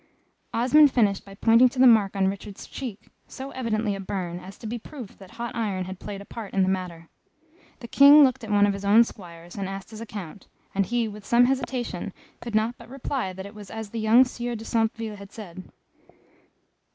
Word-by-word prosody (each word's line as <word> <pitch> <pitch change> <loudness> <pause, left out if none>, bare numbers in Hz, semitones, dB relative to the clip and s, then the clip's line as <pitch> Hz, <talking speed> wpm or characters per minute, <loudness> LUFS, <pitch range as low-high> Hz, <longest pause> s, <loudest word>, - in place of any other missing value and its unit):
Osmond 285 +6 +5
finished 205 -6 +2
by 195 0 -12
pointing 230 +4 +5
to 255 - -13
the 260 - +6
mark 215 -5 +5
on 195 -1 +2
Richard's 195 +1 -6
cheek, 240 -7 -8 0.2
so 270 +1 -8
evidently 220 -4 -1
a 195 - -5
burn, 185 -3 -4
as 185 +2 -11
to - - -12
be 235 +2 -4
proof 245 -3 -10
that 190 - -13
hot 235 0 -5
iron 200 -5 -2
had 185 0 -8
played 200 -1 -7
a - - -11
part 215 -3 -8
in 195 - +4
the 185 - +1
matter. 180 -3 -4 0.7
The 235 - -7
King 285 +4 +8
looked 255 -3 +2
at 220 - -7
one 205 -1 +4
of 205 - +1
his 200 0 -7
own 210 +4 +6
Squires 175 -5 -11
and 195 -1 -3
asked 195 +1 -7
his 220 0 -9
account, 205 -4 -8 0.3
and 195 -1 +1
he 240 -1 0
with 210 -1 -9
some 240 +4 +4
hesitation 245 -7 -2 0.3
could 235 -2 -6
not 225 +3 0
but - - -13
reply 265 -5 -3
that 190 +1 -8
it 200 - -10
was 210 -3 -11
as 220 -2 -7
the 230 - -4
young 225 +4 +6
Sieur 245 -1 -4
de 225 0 -8
Centeville 225 -1 -1
had 200 0 -12
said. 185 -4 -10
215 Hz, 215 wpm, -25 LUFS, 195-235 Hz, 0.7 s, King